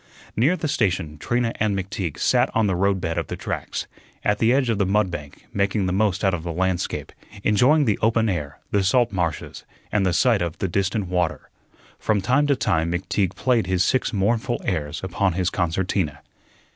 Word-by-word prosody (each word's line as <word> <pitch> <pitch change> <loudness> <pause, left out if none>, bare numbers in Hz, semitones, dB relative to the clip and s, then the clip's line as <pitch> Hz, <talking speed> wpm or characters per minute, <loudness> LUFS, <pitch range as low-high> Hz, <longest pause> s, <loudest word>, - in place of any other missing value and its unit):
Near 145 +11 +3
the 160 - -2
station 90 - -1
Trina 120 +3 0
and 105 -2 +1
McTeague 95 -4 -4
sat - - +3
on 115 - +3
the 95 -3 +1
roadbed 95 -3 0
of - - -4
the - - -4
tracks, - - -4 0.4
at 105 0 +1
the 115 +1 +4
edge 130 0 +2
of 115 -3 0
the 100 - +3
mud 100 -1 +2
bank, 75 -4 -8
making 100 0 +1
the 90 - 0
most 100 -1 +1
out 95 -2 +3
of 90 - -2
the 85 +1 -4
landscape, 90 +1 -2 0.3
enjoying 135 +9 +4
the 105 -4 +1
open 115 +1 +2
air, 75 -7 -3
the 100 -1 +2
salt 120 +5 +3
marshes, 85 -5 -3 0.3
and 105 -2 +2
the 95 - +2
sight 115 +1 +3
of 85 -2 -2
the 95 - -1
distant 100 +3 0
water. 90 -2 -2 0.5
From 110 -2 +1
time 130 +9 +2
to 140 - +3
time 85 -9 0
McTeague 95 +1 -1
played 120 -4 +1
his 95 -1 +2
six 130 - +1
mournful 115 +4 0
airs 75 -4 -2
upon 95 0 0
his 90 +1 0
concertina. 85 -4 -1
95 Hz, 195 wpm, -23 LUFS, 90-110 Hz, 0.5 s, the